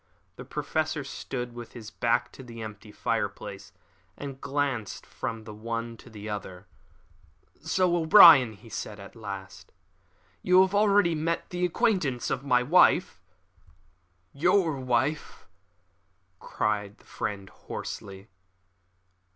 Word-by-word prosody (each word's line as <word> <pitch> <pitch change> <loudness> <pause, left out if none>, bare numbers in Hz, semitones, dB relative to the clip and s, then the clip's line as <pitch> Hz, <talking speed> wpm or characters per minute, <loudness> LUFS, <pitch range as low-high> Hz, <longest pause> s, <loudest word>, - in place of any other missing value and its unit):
The 125 - -10
Professor 150 +2 -2
stood 125 -2 -6
with 120 -1 -10
his 110 -3 -10
back 120 +1 0
to - - -12
the 115 -3 -9
empty 105 -1 -9
fireplace - - -4 0.5
and 140 -2 -8
glanced 140 -6 -2
from 115 -1 -5
the 110 -1 -9
one 115 +2 -5
to 120 - -15
the 105 -1 -9
other. 95 -3 -6 1.0
"So, 185 -2 +1
O'Brien," 160 - +8
he 105 +3 -16
said 110 -1 -6
at 100 +1 -12
last, 100 -4 -8 0.7
"you 185 0 +5
have 190 0 +2
already 205 -4 +4
made 165 +2 -1
the 180 0 0
acquaintance 165 - 0
of 130 - -2
my 125 -3 +3
wife!" 160 - +4 1.1
"Your 170 -1 +2
wife," 130 +4 -1 0.9
cried 105 -1 -2
his - - -24
friend 100 -1 -4
hoarsely. 95 +1 -8
125 Hz, 120 wpm, -27 LUFS, 110-155 Hz, 1.1 s, O'Brien